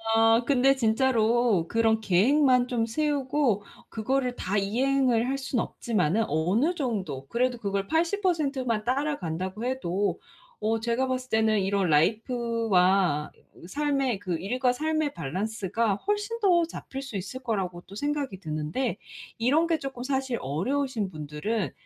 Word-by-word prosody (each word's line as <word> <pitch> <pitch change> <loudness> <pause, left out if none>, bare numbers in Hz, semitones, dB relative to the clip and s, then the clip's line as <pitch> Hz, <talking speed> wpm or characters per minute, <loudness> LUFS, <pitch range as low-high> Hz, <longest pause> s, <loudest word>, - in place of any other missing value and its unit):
아 225 +1 +5
근데 270 +1 +4
진짜로 230 -5 +2
그런 225 0 +2
계획만 250 +6 +4
좀 235 -2 0
세우고 275 -4 0 0.3
그거를 250 +3 -1
다 195 +3 -2
이행을 245 +3 +2
할 275 +1 -1
수는 265 -3 -1
없지만은 215 -2 0
어느 190 - +1
정도 200 - -3
그래도 245 - 0
그걸 200 -3 -2
80% 330 -4 +1
만 230 -4 -1
따라간다고 215 - -2
해도 205 -6 -1 0.4
어 225 +1 0
제가 235 +3 0
봤을 255 0 -3
때는 220 -1 +2
이런 195 -1 +1
라이프와 195 - +2 0.4
삶의 275 -2 0
그 180 -4 -2
일과 250 +8 +1
삶의 310 +1 -1
밸런스가 200 +6 -1
훨씬 415 - -2
더 360 -5 +4
잡힐 270 -4 -7
수 270 -6 -8
있을 200 +8 -6
거라고 190 -7 -2
또 190 - -16
생각이 285 -5 -2
드는데 160 - -2 0.4
이런 285 +9 +2
게 330 -1 +2
쪼끔 270 -4 -6
사실 265 -2 -1
어려우신 225 - -1
분들은 155 +8 -3
230 Hz, 280 characters per minute, -27 LUFS, 195-270 Hz, 0.4 s, 아